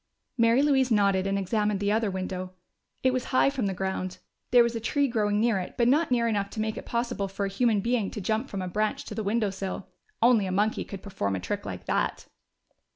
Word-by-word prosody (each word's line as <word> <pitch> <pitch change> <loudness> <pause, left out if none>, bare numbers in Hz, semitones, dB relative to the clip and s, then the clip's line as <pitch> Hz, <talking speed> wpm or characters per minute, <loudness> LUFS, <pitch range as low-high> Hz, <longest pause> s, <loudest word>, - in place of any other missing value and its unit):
Mary 230 +2 +4
Louise 270 -3 +3
nodded 200 -3 +3
and 195 0 0
examined 210 +1 0
the 205 0 +1
other 220 0 +1
window. 185 -1 -4 0.5
It 260 -1 +3
was 255 -1 -1
high 260 +1 +3
from 260 -7 -1
the 195 - -1
ground; 185 -1 -3 0.3
there 245 -1 +7
was 235 0 -1
a - - -1
tree 280 +6 +1
growing 210 -4 +1
near 225 -3 +2
it, 180 - -6
but 235 - +3
not 300 +6 +3
near 235 -2 +2
enough 200 -3 0
to 215 - -7
make 220 0 -1
it - - -8
possible 235 -4 -1
for 195 +1 -3
a - - -2
human 215 +1 +2
being 230 -2 0
to - - -6
jump 220 +6 -1
from 195 -2 -4
a - - -3
branch 210 +4 -1
to - - -7
the 220 - -3
window 210 0 0
sill. 195 0 -5 0.3
Only 230 -4 +4
a - - -2
monkey 210 +3 +1
could 195 -2 -8
perform 100 - -2
a - - -2
trick 90 - -4
like - - -6
that! - - -1
210 Hz, 235 wpm, -27 LUFS, 195-235 Hz, 0.5 s, there